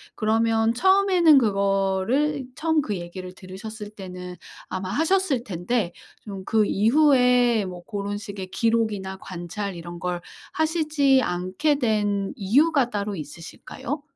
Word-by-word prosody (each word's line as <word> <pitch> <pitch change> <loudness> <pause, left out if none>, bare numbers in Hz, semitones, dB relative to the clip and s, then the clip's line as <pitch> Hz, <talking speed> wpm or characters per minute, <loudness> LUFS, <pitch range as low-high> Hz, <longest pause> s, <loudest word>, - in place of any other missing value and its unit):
그러면 225 +1 +2
처음에는 370 -1 +5
그거를 200 +6 +1
처음 320 0 +1
그 210 -7 -3
얘기를 180 +1 -7
들으셨을 205 +3 -9
때는 180 -3 -8 0.3
아마 185 0 -4
하셨을 320 - +1
텐데 180 0 -2 0.3
좀 195 -2 -7
그 215 -2 +2
이후에 245 -2 +4
뭐 180 -1 -8
고런 205 0 -4
식의 200 -2 -7
기록이나 210 -3 -1
관찰 185 +2 -5
이런 170 0 -8
걸 180 0 -2 0.3
하시지 305 -4 +2
않게 185 - 0
된 205 -5 0
이유가 265 +5 +3
따로 205 -1 -3
있으실까요? 165 - -7
210 Hz, 270 characters per minute, -24 LUFS, 190-265 Hz, 0.3 s, 처음에는